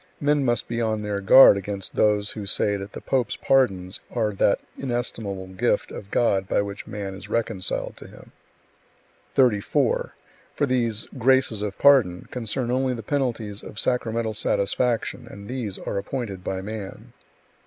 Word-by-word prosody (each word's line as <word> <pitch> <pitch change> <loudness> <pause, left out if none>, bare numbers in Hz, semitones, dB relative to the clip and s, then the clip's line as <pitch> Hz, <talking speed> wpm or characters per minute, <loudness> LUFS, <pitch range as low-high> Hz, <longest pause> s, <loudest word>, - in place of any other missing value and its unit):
Men 145 0 +2
must 120 -2 0
be 120 0 -2
on 110 -2 -1
their 100 -1 -2
guard 100 +1 +8
against 100 0 -5
those 105 -1 +2
who 105 -2 -6
say 105 0 +1
that 100 0 -7
the - - -7
pope's 130 -3 0
pardons 100 -8 +1
are 110 -3 0
that 100 - +2 0.2
inestimable 115 -7 -3
gift 95 0 0
of 100 - -8
God 100 -5 +1
by - - +2
which 100 0 -4
man 100 -2 -5
is 100 +2 -10
reconciled 110 -4 -2
to - - -11
Him; - - -15 1.0
34. 120 -7 +2 0.4
For - - +2
these 115 -5 +1
"graces 130 -3 +3
of 105 -2 -4
pardon" 125 -11 +4
concern 120 +1 -2
only 130 0 +1
the 115 - -7
penalties 115 -6 -2
of 105 - -11
sacramental 115 -2 -1
satisfaction, 110 +4 -1
and 100 0 -10
these 120 -6 -4
are 100 - -3
appointed 100 -3 -5
by 95 0 -3
man. 105 -1 -7
110 Hz, 155 wpm, -24 LUFS, 100-125 Hz, 1.0 s, guard